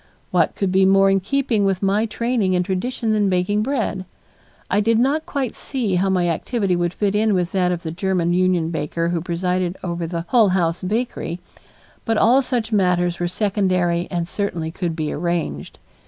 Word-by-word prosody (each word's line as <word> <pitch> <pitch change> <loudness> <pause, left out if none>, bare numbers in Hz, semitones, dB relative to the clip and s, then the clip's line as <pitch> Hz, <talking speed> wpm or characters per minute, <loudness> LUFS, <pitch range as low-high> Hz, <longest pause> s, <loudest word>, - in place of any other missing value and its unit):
What - - +2
could 195 -2 -1
be 190 +1 +4
more 195 0 +5
in 195 - +3
keeping 235 +1 0
with 195 -1 0
my 205 +3 +2
training 225 -4 0
and 180 0 +1
tradition 220 +4 -2
than 205 -2 +2
baking 185 +3 +1
bread? 220 -6 -1 0.6
I 200 - +1
did 225 +2 +2
not 280 +6 +1
quite 270 -5 -2
see 245 -8 -2
how 185 +2 +2
my 180 -2 +1
activity 190 +3 0
would 175 -1 0
fit 200 +2 -1
in 210 0 +2
with 180 -1 0
that 180 -2 +1
of 175 -1 -3
the 160 - -4
German 175 -1 0
union 180 -2 +1
baker 165 +2 -2
who 170 -1 -1
presided 180 +1 -1
over 170 -2 -3
the 170 0 -4
Hull 230 -5 +5
House 175 -2 0
bakery, 210 -3 -3 0.6
but 225 -1 0
all 240 +6 +5
such 245 -4 -2
matters 180 -4 +1
were 175 - 0
secondary 185 -3 0
and 170 -2 -2
certainly 175 -5 -3
could 170 -2 -3
be 155 -2 -2
arranged. 170 +1 -3
185 Hz, 185 wpm, -21 LUFS, 175-215 Hz, 0.6 s, more